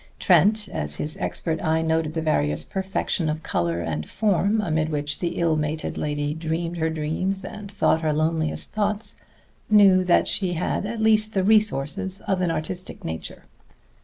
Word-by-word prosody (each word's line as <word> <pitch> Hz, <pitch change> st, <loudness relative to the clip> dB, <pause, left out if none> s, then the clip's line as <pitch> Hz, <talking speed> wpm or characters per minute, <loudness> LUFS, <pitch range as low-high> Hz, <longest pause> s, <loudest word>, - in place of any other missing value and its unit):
Trent, 205 Hz, +4 st, +4 dB
as 75 Hz, 0 st, -2 dB
his 150 Hz, -, -3 dB
expert 160 Hz, -2 st, -3 dB
eye 160 Hz, +1 st, +1 dB
noted 160 Hz, -1 st, 0 dB
the 160 Hz, -, -1 dB
various 75 Hz, -, +1 dB
perfection 190 Hz, -, -2 dB
of 155 Hz, +1 st, -3 dB
color 85 Hz, 0 st, -1 dB
and 75 Hz, -2 st, -4 dB
form 205 Hz, 0 st, +1 dB
amid 160 Hz, -5 st, 0 dB
which 150 Hz, -1 st, -2 dB
the 170 Hz, -2 st, -2 dB
ill 165 Hz, -2 st, +2 dB
mated 155 Hz, +1 st, -2 dB
lady 145 Hz, 0 st, -2 dB
dreamed 165 Hz, +2 st, -3 dB
her 160 Hz, 0 st, 0 dB
dreams 160 Hz, +5 st, -2 dB
and 210 Hz, -2 st, -8 dB
thought 195 Hz, -5 st, +2 dB
her 155 Hz, -1 st, +1 dB
loneliest 155 Hz, 0 st, 0 dB
thoughts, 210 Hz, 0 st, -2 dB, 0.5 s
knew 200 Hz, -3 st, +6 dB
that 180 Hz, -1 st, +3 dB
she 185 Hz, -3 st, 0 dB
had 180 Hz, +4 st, -1 dB
at 230 Hz, +1 st, -4 dB
least 215 Hz, 0 st, +2 dB
the 190 Hz, -, +2 dB
resources 195 Hz, -2 st, +1 dB
of 190 Hz, -2 st, -1 dB
an 180 Hz, -, +1 dB
artistic 165 Hz, +3 st, -4 dB
nature. 80 Hz, 0 st, -6 dB
165 Hz, 165 wpm, -24 LUFS, 155-195 Hz, 0.5 s, knew